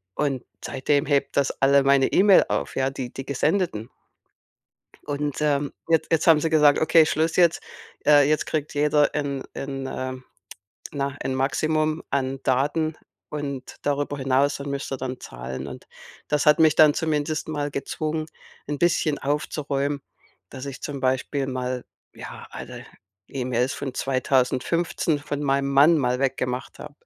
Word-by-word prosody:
und 135 -4 -1 0.2
seitdem 140 +2 0
hebt 140 -1 0
das 140 - +2
alle 140 0 +5
meine 135 -1 +4
E-Mail 195 0 +6
auf, - - -2
ja, 130 0 +1
die 130 -2 -6
die 135 - -6
Gesendeten. 140 - -1 1.2
Und, 145 -1 -3
ähm, 145 -1 0 0.2
jetzt 165 -1 +2
jetzt 165 - +2
haben 160 -3 +6
sie 165 - -1
gesagt: 150 -2 +5
„Okay, 160 0 +5
Schluss 160 +1 0
jetzt. 170 -2 +4 0.5
Äh, 145 -1 +6
jetzt 155 0 +1
kriegt 150 -1 -3
jeder 150 0 +2
ein 140 -2 -2
ein 135 -1 -5
ähm, 130 -1 -5 0.7
na, 140 -1 -3
ein 130 - -2
Maximum 155 +4 0
an 135 -1 -1
Daten 150 +5 0 0.3
und 140 -3 -5
darüber 145 0 -1
hinaus 135 +1 +1
dann 140 0 -6
müsst 140 0 -4
ihr 135 - -1
dann 130 -1 -5
zahlen.“ - - -7
Und - - -10 0.4
das 150 0 0
hat 150 - +6
mich 155 -2 +5
dann 150 -2 +7
zumindest 155 0 -1
mal 145 -2 -2
gezwungen 155 +3 -3 0.4
'n 145 -1 -3
bisschen 160 -3 +1
aufzuräumen, 145 0 -2 0.5
dass 130 +1 -8
ich 140 -1 -8
zum 140 -2 -5
Beispiel 130 +2 0
mal 125 -1 -3 0.3
ja, - - -9
alle - - -9 0.4
E-Mails 125 0 -1
von 135 -3 -5
2015 135 +5 0
von 145 0 -4
meinem 140 -1 +1
Mann 145 +4 +5
mal 125 -2 0
weggemacht 130 -1 -2
habe. 150 -1 -10
140 Hz, 155 wpm, -24 LUFS, 135-150 Hz, 1.2 s, dann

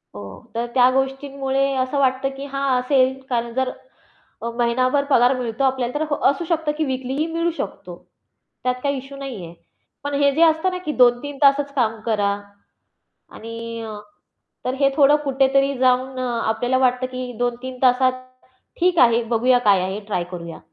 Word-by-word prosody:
हो, 100 -1 -11
तर 235 +1 -1
त्या 250 -1 +5
गोष्टींमुळे 270 0 -1
असं 260 +2 -1
वाटतं, 265 0 +1
की 275 - -6
हां, 275 -2 0
असेल 260 0 +2
कारण 235 -2 -2
जर 260 0 0 0.7
अ, 235 - -2
महिनाभर 255 +4 +2
पगार 245 -1 +5
मिळतो 240 +1 -2
आपल्याला 260 -2 0
तर 310 - -2
ह 290 - +1
असू 340 - -3
शकतं 320 -3 -1
की 315 - +1
वीकलीही 265 +3 -2
मिळू 335 +1 0
शकतो. - - -6 0.7
त्यात 250 0 +1
काही 280 -1 0
इश्यू 275 +1 -10
नाही 260 -9 -6
आहे. 170 0 -10 0.5
पण 285 0 -3
हे 280 - +5
जे 325 - +2
असतं 320 +2 +4
ना 365 - -3
की 305 - -1
2-3 250 +3 +3
तासच 280 0 +4
काम 225 -4 0
करा 205 -3 +1 1.1
आणि 230 0 -7 0.8
तर 255 - -1
हे 275 0 +4
थोडं 290 0 +6
कुठेतरी 275 0 +2
जाऊन 255 +1 +1
अ, 255 - -1 0.2
आपल्याला 245 +3 +1
वाटतं 255 0 +2
की 255 -1 -5
2-3 245 +1 -3
तासात 255 0 +4 0.7
ठीक 360 -1 +2
आहे, 235 -2 +5
बघूया 245 +2 +3
काय 195 -2 +5
आहे, 190 +3 -3
ट्राय 180 -4 -1
करूया. 170 -2 -7
260 Hz, 170 wpm, -21 LUFS, 240-275 Hz, 1.1 s, थोडं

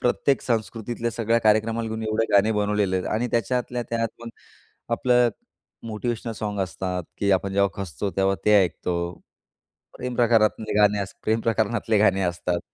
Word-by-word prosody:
प्रत्येक 130 +2 +1
संस्कृतीतल्या 115 0 -2
सगळ्या 115 0 +1
कार्यक्रमाला 110 +1 +2
घेऊन 110 0 -4
एवढे 110 +1 0
गाणे 100 +2 +5
बनवलेले 105 -2 +1
आहेत 90 - -2
आणि 115 +3 0
त्याच्यातल्या 120 +2 -1
त्यातून 115 0 -3 0.6
आपलं 125 0 +3 0.6
मोटिव्हेशनल 115 +1 -3
सॉन्ग 105 -2 -4
असतात 90 -1 -3 0.2
की 100 - +1
आपण 95 +1 0
जेव्हा 100 0 +3
खचतो 95 +2 -4
तेव्हा 95 0 +2
ते 105 - +4
ऐकतो. 90 0 -2 1.0
प्रेमप्रकारातले 115 -3 +1
गाणे 105 0 +4
अस 100 - -5
प्रेमप्रकरणातले 110 0 +1
गाणे 100 -2 +3
असतात 85 0 -1
110 Hz, 135 wpm, -24 LUFS, 100-115 Hz, 1.0 s, गाणे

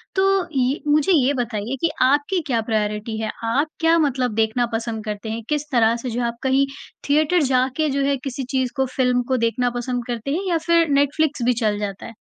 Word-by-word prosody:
तो 390 0 +2
ये 260 +4 +1
मुझे 300 +5 +3
ये 280 - +2
बताइए 235 -2 -3
कि 335 - +2
आपकी 290 +8 +2
क्या 235 -4 +1
प्रायोरिटी 215 0 -2
है? 220 - -2
आप 265 +7 +1
क्या 330 +1 +4
मतलब 260 -6 0
देखना 225 +2 +1
पसंद 225 -1 -3
करते 210 +1 -5
है? 230 +1 -4
किस 300 -1 0
तरह 230 -2 +3
से 245 +1 -5
जो 240 +2 -2
है 235 - +1
आप 235 - -5
कहीं 265 +1 +3 0.4
थिएटर 310 +4 +3
जा 255 -1 +2
के 310 -1 +1
जो 280 0 0
है 280 0 +1
किसी 270 -1 -4
चीज़ 260 -2 0
को, 265 - +1
फिल्म 250 -1 +2
को 260 - +1
देखना 245 +1 +1
पसंद 245 0 -3
करते 240 +2 -3
हैं 370 +6 -2
या 340 - +2
फिर 335 -1 +4
नेटफ्लिक्स 285 0 +1
भी 250 - +4
चल 210 -1 +1
जाता 200 -2 -5
है? 230 - -9
255 Hz, 220 wpm, -21 LUFS, 230-290 Hz, 0.4 s, क्या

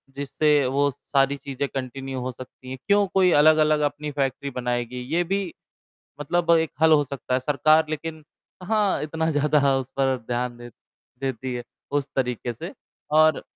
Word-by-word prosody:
जिससे 145 +1 +2
वो 140 +2 +2
सारी 135 +1 0
चीज़ें 140 0 -4
कंटिन्यू 135 0 -4
हो 125 +1 -3
सकती 130 +1 -12
हैं। 130 - -5
क्यों 205 0 +4
कोई 185 -2 +4
अलग-अलग 155 0 +5
अपनी 150 +1 -7
फैक्ट्री 140 0 -2
बनाएगी, 125 0 -2 0.2
ये 175 - +3
भी 190 0 -2 0.7
मतलब 170 +3 +1
एक 160 -1 0
हल 160 0 +6
हो 150 -2 +5
सकता 135 -2 -5
है, 130 - +3
सरकार 150 +4 +3
लेकिन 155 +1 -5 0.4
कहाँ 205 +1 +1
इतना 160 +1 -1
ज़्यादा 145 -2 +3
उस 130 -1 -4
पर 135 -1 +2
ध्यान 120 0 -2
दे 120 0 -10 0.5
देती 130 -1 -3
है 120 - -5 0.3
उस 145 -1 -1
तरीके 125 -2 -1
से 115 - -8 0.4
और 155 0 +4
140 Hz, 165 wpm, -24 LUFS, 130-155 Hz, 0.7 s, हल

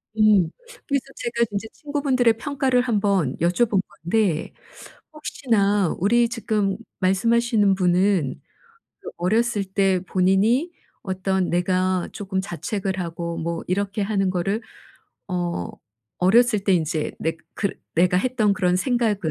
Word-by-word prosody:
음 210 -6 +4 0.4
그래서 280 -2 0
제가 235 0 0
진짜 205 +1 -4
친구분들의 270 -6 +1
평가를 265 -1 +1
1 240 -4 0
번 195 -10 +1
여쭤본 195 +5 +2 0.2
건데 175 -2 0 0.6
혹시나 210 - 0
우리 235 +6 +3
지금 210 -4 -1 0.2
말씀하시는 215 +1 +2
분은 180 -4 +1 0.6
그 - - -8
어렸을 220 +4 +1
때 190 -1 +1
본인이 200 - +2 0.3
어떤 190 -1 -1
내가 185 +1 +1
조금 190 -2 -3
자책을 190 +1 -3
하고 170 -1 -4
뭐 170 0 -3
이렇게 200 +3 -1
하는 195 -2 0
거를 195 +5 -1 0.7
어 175 - -2 0.5
어렸을 220 +4 +4
때 195 - +3
인제 160 -2 -1
내가 165 +1 -2 0.2
그랬 200 -2 -2 0.2
내가 180 +2 +3
했던 220 -1 +1
그런 180 -1 +1
생각을 230 +1 +1
195 Hz, 260 characters per minute, -23 LUFS, 180-230 Hz, 0.7 s, 음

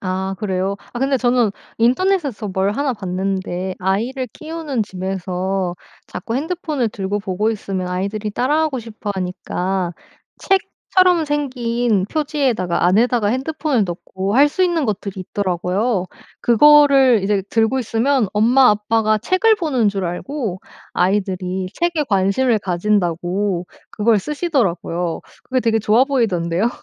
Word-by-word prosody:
아 190 +1 -2
그래요? 195 -1 -1 0.2
아 240 - -5
근데 270 +1 +1
저는 245 -3 +2 0.3
인터넷에서 260 - +1
뭘 190 +2 0
하나 275 +2 0
봤는데 190 -2 -3
아이를 230 +8 -1
키우는 310 -6 -3
집에서 185 -1 -3 0.3
자꾸 225 +6 -5
핸드폰을 305 -4 -1
들고 200 0 -3
보고 200 +3 -1
있으면 195 -4 -3
아이들이 200 +4 -3
따라하고 280 +3 0
싶어 215 -2 -6
하니까 185 0 -2 0.5
책처럼 370 -3 +2
생긴 245 -8 0
표지에다가 270 - 0
안에다가 225 +3 +3
핸드폰을 265 -1 0
넣고 190 +3 -4
할 285 +3 +6
수 370 - -1
있는 335 -4 +1
것들이 200 -3 -3
있더라구요. 185 +2 -1 0.4
그거를 270 -2 +6
이제 200 -1 +1
들고 225 +3 +1
있으면 235 0 +1
엄마 250 +5 +5
아빠가 215 +1 +1
책을 375 - +3
보는 270 - +1
줄 195 -2 -2
알고 190 - -4 0.3
아이들이 185 -1 0
책에 345 -3 0
관심을 205 +4 +2
가진다고 180 -1 -1 0.2
그걸 215 0 +2
쓰시더라고요. 190 - -1 0.2
그거 255 -1 0
되게 225 -1 +2
좋아보이던데요. 215 - +2
215 Hz, 315 characters per minute, -19 LUFS, 190-265 Hz, 0.5 s, 할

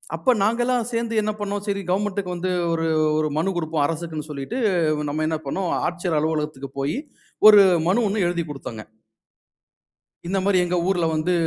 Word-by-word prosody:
அப்ப 260 - +2
நாங்கெல்லாம் 240 +2 +1
சேர்ந்து 230 -1 0
என்ன 215 0 -1
பண்ணனோம்? 205 0 -3
சரி 200 0 -1
கவர்ன்மென்ட்க்கு 195 -1 -1
வந்து 185 +2 -2 0.2
ஒரு 165 0 0 0.3
ஒரு 155 0 +1
மனு 190 +5 0
குடுப்போம். 160 -3 -1
அரசுக்குன்னு 160 -1 -4
சொல்லிட்டு, 140 - -5 0.4
வ 150 - -3
நம்ம 155 +2 -1
என்ன 160 - -1
பண்ணோம், 180 +6 -2 0.2
ஆட்சியர் 175 -2 -2
அலுவலகத்துக்கு 150 -3 -2
போயி 140 - -1 0.5
ஒரு 210 -1 +10 0.3
மனு 220 +6 +2
ஒண்ணு 200 -2 0
எழுதி 170 -1 -1
குடுத்தோங்க. 120 -6 -7 1.4
இந்த 195 - -1
மாரி 200 -1 +3
எங்க 175 +1 -1
ஊர்ல 180 -3 +1
வந்து 155 +3 0
175 Hz, 160 wpm, -23 LUFS, 155-200 Hz, 1.4 s, ஒரு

